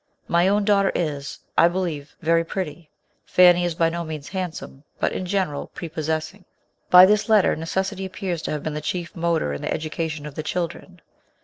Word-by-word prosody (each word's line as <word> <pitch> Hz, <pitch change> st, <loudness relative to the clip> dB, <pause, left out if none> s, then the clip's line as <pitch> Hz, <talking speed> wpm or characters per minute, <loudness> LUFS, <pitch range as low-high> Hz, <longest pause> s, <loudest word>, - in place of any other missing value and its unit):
My 170 Hz, +2 st, +3 dB
own 200 Hz, +1 st, +2 dB
daughter 200 Hz, -2 st, +3 dB
is, 145 Hz, -5 st, -3 dB, 0.2 s
I 170 Hz, -, +6 dB
believe, 170 Hz, -5 st, -3 dB
verj 165 Hz, +1 st, +2 dB
pretty. 175 Hz, -4 st, -5 dB, 0.3 s
Fanny 180 Hz, -1 st, +5 dB
is 175 Hz, -2 st, -2 dB
by 165 Hz, -1 st, +2 dB
no 170 Hz, +1 st, -3 dB
means 155 Hz, -3 st, -7 dB
handsome, 180 Hz, -7 st, -6 dB, 0.2 s
but, -, -, +1 dB
in 185 Hz, -, -4 dB
general, 180 Hz, -7 st, -1 dB
pre 170 Hz, -, -6 dB
possessing. 160 Hz, +4 st, -3 dB, 0.5 s
By 180 Hz, 0 st, +10 dB
this 210 Hz, +3 st, +2 dB
letter 215 Hz, -3 st, +4 dB
necessity 190 Hz, +4 st, -2 dB
appears 185 Hz, -3 st, -4 dB
to -, -, -4 dB
have 150 Hz, -, -3 dB
been 155 Hz, -, -3 dB
the 150 Hz, -, -4 dB
chief 175 Hz, +2 st, -4 dB
motor 165 Hz, -, 0 dB
in 70 Hz, -, -5 dB
the -, -, -3 dB
education 155 Hz, -1 st, -3 dB
of 150 Hz, -, -7 dB
the 155 Hz, -, -4 dB
children. 180 Hz, +1 st, -4 dB
170 Hz, 190 wpm, -23 LUFS, 155-185 Hz, 0.5 s, By